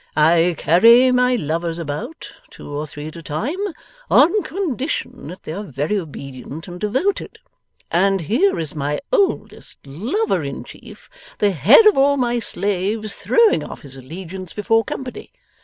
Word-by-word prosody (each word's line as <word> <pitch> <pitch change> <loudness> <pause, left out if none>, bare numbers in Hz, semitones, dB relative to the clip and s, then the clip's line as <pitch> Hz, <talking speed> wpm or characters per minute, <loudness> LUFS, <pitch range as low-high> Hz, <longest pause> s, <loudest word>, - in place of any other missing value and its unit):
I 165 +3 +4
carry 235 +9 +6
my 250 0 +3
lovers 165 -3 -2
about, 160 - -6 0.2
two - - -12
or 150 +1 -4
three 145 0 -8
at 155 - -14
a 170 - -8
time, 215 - -3 0.5
on 355 +8 +5
condition 285 - -4
that 180 +4 -10
they 155 - -6
are 195 - -5
very 150 +2 -2
obedient 140 -3 -7
and 175 0 -8
devoted; 260 - -1 0.5
and 195 +2 +2
here 255 - +1
is 160 -3 -4
my 145 0 -2
oldest 405 -6 -1
lover 225 - -1
in - - -5
chief, - - -14 0.3
the 205 -1 +2
head 220 - +6
of 420 -9 +6
all 280 +1 +4
my 240 -2 0
slaves, 205 +1 -2
throwing 465 -3 +3
off - - -9
his 135 -2 -10
allegiance 175 +7 -8
before 225 +2 +1
company! 255 +3 -7
195 Hz, 155 wpm, -20 LUFS, 160-255 Hz, 0.5 s, carry